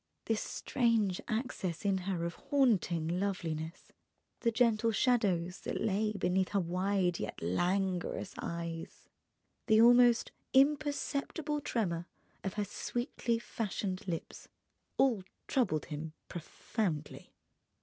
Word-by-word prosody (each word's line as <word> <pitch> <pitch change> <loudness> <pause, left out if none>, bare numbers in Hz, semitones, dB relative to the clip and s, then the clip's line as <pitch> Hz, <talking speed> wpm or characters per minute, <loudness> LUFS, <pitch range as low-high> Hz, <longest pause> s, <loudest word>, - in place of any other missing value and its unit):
This 225 -1 0
strange 225 -7 +1
access 215 -7 -2
in 195 -1 +2
her 170 -3 -1
of 170 - -2
haunting 205 - +2
loveliness, 165 -4 -3 0.5
the 235 - +2
gentle 230 -1 +3
shadows 195 -7 +2
that - - -3
lay 215 +1 +1
beneath 185 -1 +1
her 200 - +1
wide—yet 180 - 0
languorous 180 - 0
eyes, 170 -1 -5 0.6
the 220 -1 +6
almost 240 0 +6 0.2
imperceptible 290 +1 +1
tremor 175 - -1 0.4
of 195 - -3
her 210 -1 0
sweetly 240 +2 -2
fashioned 200 -4 -3
lips, 165 -3 -5 0.5
all 245 -7 +4 0.3
troubled 230 - +1
him 155 +1 -5
profoundly. 170 -1 -4
200 Hz, 105 wpm, -33 LUFS, 175-235 Hz, 0.6 s, the